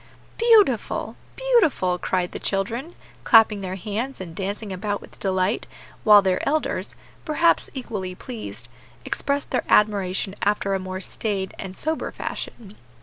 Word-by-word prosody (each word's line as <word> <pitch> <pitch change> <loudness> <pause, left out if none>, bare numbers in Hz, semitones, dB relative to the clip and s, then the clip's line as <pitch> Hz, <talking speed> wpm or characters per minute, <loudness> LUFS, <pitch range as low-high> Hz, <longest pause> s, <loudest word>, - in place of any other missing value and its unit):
"Beautiful! 430 - +3 0.2
beautiful!" 330 - +2
cried 180 -1 -1
the - - -6
children, 230 - -2 0.3
clapping 220 -2 +6
their 185 -1 -4
hands 220 +8 -4
and 170 -3 -8
dancing 200 +2 -4
about 205 +2 -2
with - - -14
delight, 190 +2 0 0.4
while 210 -3 +8
their 185 -1 +2
elders, 310 +1 -1 0.3
perhaps 335 +2 +2
equally 205 -8 -4
pleased, 150 - -7 0.4
expressed 280 0 -2
their - - +1
admiration 195 -2 +2
after 200 -1 +1
a 195 - +1
more 185 0 -5
staid 195 -1 -3
and 190 -1 -6
sober 315 +7 -2
fashion. 210 -3 -6
205 Hz, 135 wpm, -24 LUFS, 190-255 Hz, 0.4 s, while